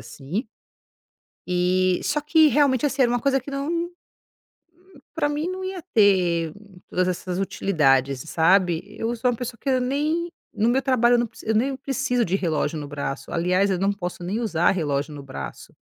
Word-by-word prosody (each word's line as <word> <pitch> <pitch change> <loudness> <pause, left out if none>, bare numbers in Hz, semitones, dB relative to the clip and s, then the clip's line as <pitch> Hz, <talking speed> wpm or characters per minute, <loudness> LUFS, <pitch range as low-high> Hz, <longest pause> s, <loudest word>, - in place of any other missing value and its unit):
assim. 135 - -5 1.0
E 180 0 +2
só 295 +1 0
que 310 +1 +5
realmente, 280 -2 +3
assim, 275 -1 +2
era 240 - +3
uma 245 - +1
coisa 270 +1 +2
que 270 - -9
não 325 +5 -2 1.3
pra 295 -2 +1
mim 300 +4 -2
não 375 0 -5
ia 375 -1 -4
ter 175 -6 +3 0.4
todas 185 0 +1
essas 180 0 -3
utilidades, 140 -9 +1
sabe. 175 0 +3
Eu 225 +3 -4
sou 245 +2 +1
uma 235 - -3
pessoa 235 -1 -6
que 275 - -2
eu 255 -1 +2
nem 305 +7 -1 0.2
no 220 +3 +1
meu 265 +3 +2
trabalho, 245 -3 +3
eu 240 - +4
não 240 - +1
prec - - -15
eu 220 - +2
nem 265 +5 +1
preciso 265 -2 -1
de 190 -1 +1
relógio 165 -3 -1
no 145 - -5
braço. 140 -1 -5
Aliás, 180 +3 +2
eu 185 - 0
não 195 +2 +2
posso 180 -2 -6
nem 200 +6 -2
usar 175 -7 +2
relógio 145 -4 -2
no 145 - -8
braço. 70 - -8
205 Hz, 185 wpm, -24 LUFS, 175-270 Hz, 1.3 s, que